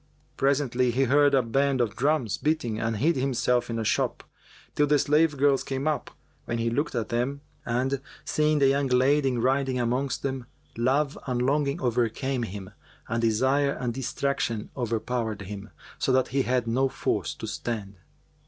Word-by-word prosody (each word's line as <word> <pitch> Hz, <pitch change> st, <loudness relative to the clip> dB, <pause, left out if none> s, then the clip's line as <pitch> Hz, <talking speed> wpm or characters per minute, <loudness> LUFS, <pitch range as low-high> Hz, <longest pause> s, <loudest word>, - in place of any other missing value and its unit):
Presently, 135 Hz, -2 st, +1 dB
he 125 Hz, +3 st, +2 dB
heard 140 Hz, +2 st, +4 dB
a 130 Hz, -, +3 dB
band 135 Hz, +3 st, +1 dB
of 110 Hz, -5 st, 0 dB
drums 135 Hz, -5 st, +1 dB
beating 145 Hz, -8 st, 0 dB
and 115 Hz, -1 st, -1 dB
hid 155 Hz, +9 st, +2 dB
himself 125 Hz, -2 st, +1 dB
in 115 Hz, -, -2 dB
a 115 Hz, -, -1 dB
shop, -, -, 0 dB, 0.5 s
till 150 Hz, -, +2 dB
the 145 Hz, +1 st, +4 dB
slave 150 Hz, +1 st, +3 dB
girls 140 Hz, -1 st, +3 dB
came 135 Hz, +2 st, -3 dB
up, 155 Hz, -2 st, -1 dB, 0.4 s
when 120 Hz, -, -2 dB
he 115 Hz, 0 st, 0 dB
looked 145 Hz, +3 st, -1 dB
at 115 Hz, -2 st, -2 dB
them; 125 Hz, +4 st, -1 dB, 0.3 s
and, 130 Hz, +3 st, 0 dB, 0.2 s
seeing 155 Hz, 0 st, +2 dB
the 140 Hz, -2 st, +4 dB
young 140 Hz, +1 st, +2 dB
lady 130 Hz, +1 st, +3 dB
riding 130 Hz, +1 st, +1 dB
amongst 125 Hz, +3 st, -1 dB
them, 130 Hz, -3 st, -3 dB, 0.3 s
love 135 Hz, +5 st, +1 dB
and 125 Hz, -1 st, 0 dB
longing 140 Hz, +3 st, +1 dB
overcame 125 Hz, +1 st, 0 dB
him 100 Hz, -3 st, -6 dB, 0.4 s
and 115 Hz, +1 st, 0 dB
desire 130 Hz, +5 st, +2 dB
and 125 Hz, -2 st, -3 dB
distraction 130 Hz, -3 st, -2 dB
overpowered 115 Hz, -3 st, -2 dB
him, 100 Hz, +2 st, -8 dB, 0.3 s
so -, -, +1 dB
that 130 Hz, 0 st, +2 dB
he 135 Hz, +2 st, +1 dB
had 125 Hz, -2 st, 0 dB
no 130 Hz, +4 st, +1 dB
force 135 Hz, -, -2 dB
to -, -, -7 dB
stand. 100 Hz, -5 st, -4 dB
130 Hz, 170 wpm, -26 LUFS, 115-140 Hz, 0.5 s, heard